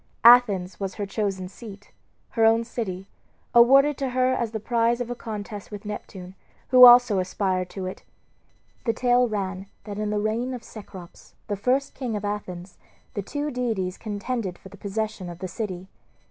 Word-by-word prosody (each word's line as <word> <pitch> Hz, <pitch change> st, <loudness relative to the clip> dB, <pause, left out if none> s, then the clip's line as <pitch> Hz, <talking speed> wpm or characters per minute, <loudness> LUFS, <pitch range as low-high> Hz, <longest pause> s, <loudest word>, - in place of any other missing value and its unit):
Athens 220 Hz, -6 st, +6 dB
was 195 Hz, -2 st, -4 dB
her 205 Hz, -, -3 dB
chosen 195 Hz, -2 st, -2 dB
seat, 205 Hz, 0 st, -12 dB, 0.4 s
her 225 Hz, -, +1 dB
own 225 Hz, +1 st, +5 dB
city, 195 Hz, -5 st, -5 dB, 0.5 s
awarded 275 Hz, +4 st, +6 dB
to 270 Hz, -2 st, -1 dB
her 255 Hz, +1 st, +2 dB
as 235 Hz, -3 st, -1 dB
the 220 Hz, 0 st, -4 dB
prize 235 Hz, +1 st, +1 dB
of 245 Hz, -1 st, -4 dB
a -, -, -3 dB
contest 210 Hz, -3 st, -7 dB
with 210 Hz, 0 st, -9 dB
Neptune, 190 Hz, -3 st, -7 dB, 0.4 s
who 250 Hz, 0 st, +10 dB
also 240 Hz, -4 st, +7 dB
aspired 185 Hz, -1 st, -1 dB
to 190 Hz, -2 st, -6 dB
it. 185 Hz, -, -6 dB, 0.8 s
The 230 Hz, -, +2 dB
tale 245 Hz, +1 st, +3 dB
ran 195 Hz, -3 st, -4 dB, 0.2 s
that 205 Hz, -1 st, -7 dB
in 210 Hz, 0 st, -1 dB
the 210 Hz, -, -1 dB
reign 225 Hz, +5 st, -1 dB
of 245 Hz, -, -9 dB
Cecrops, 190 Hz, -5 st, -12 dB
the 205 Hz, -, -1 dB
first 260 Hz, +7 st, 0 dB
king 245 Hz, -5 st, -4 dB
of 205 Hz, 0 st, -4 dB
Athens, 185 Hz, -3 st, -6 dB, 0.3 s
the 205 Hz, -, -2 dB
two 290 Hz, +8 st, -4 dB
deities 220 Hz, -8 st, -2 dB
contended 210 Hz, -2 st, -4 dB
for 190 Hz, -, -14 dB
the -, -, -13 dB
possession 205 Hz, -2 st, -4 dB
of 170 Hz, -, -8 dB
the 185 Hz, -, -5 dB
city. 185 Hz, -1 st, -5 dB
210 Hz, 175 wpm, -25 LUFS, 195-240 Hz, 0.8 s, who